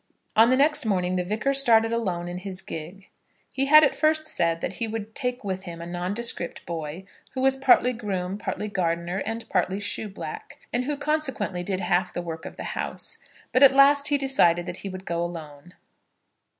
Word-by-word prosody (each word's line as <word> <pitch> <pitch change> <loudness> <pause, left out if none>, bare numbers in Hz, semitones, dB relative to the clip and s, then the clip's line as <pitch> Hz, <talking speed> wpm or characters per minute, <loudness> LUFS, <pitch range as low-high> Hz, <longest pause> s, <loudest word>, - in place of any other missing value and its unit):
On 225 +2 +6
the 255 - +3
next 295 +2 +4
morning 185 -4 0
the 180 - 0
Vicar 215 +9 -1
started 230 -4 +5
alone 185 -7 -2
in 175 +1 -5
his 185 -1 -6
gig. 175 +5 -9 0.4
He 270 +1 0
had 305 +2 +8
at 275 - +3
first 310 0 +1
said 170 - 0
that 180 +2 -5
he 230 - 0
would 220 0 -6
take 250 -1 -3
with 190 -1 -4
him 170 -2 -8
a 170 - -7
nondescript 180 +2 -2
boy, 165 +2 -6 0.3
who 260 - -3
was 265 0 +3
partly 260 -2 +4
groom, 195 -4 -4
partly 210 - -4
gardener, 175 -1 -2
and 225 +1 -5
partly 185 +1 0
shoeblack, 200 -5 -5 0.2
and 245 +1 0
who 290 +1 -2
consequently 275 - -1
did 185 +1 -2
half 180 0 0
the 175 - -3
work 165 -1 -7
of - - -10
the - - -7
house; - - -4 0.3
but 255 - +2
at 270 -1 +7
last 280 +1 +6
he 290 - +2
decided 175 -11 +3
that - - -6
he 200 - -6
would 185 0 -8
go 170 0 -2
alone. 165 -1 -8
200 Hz, 195 wpm, -25 LUFS, 175-255 Hz, 0.4 s, had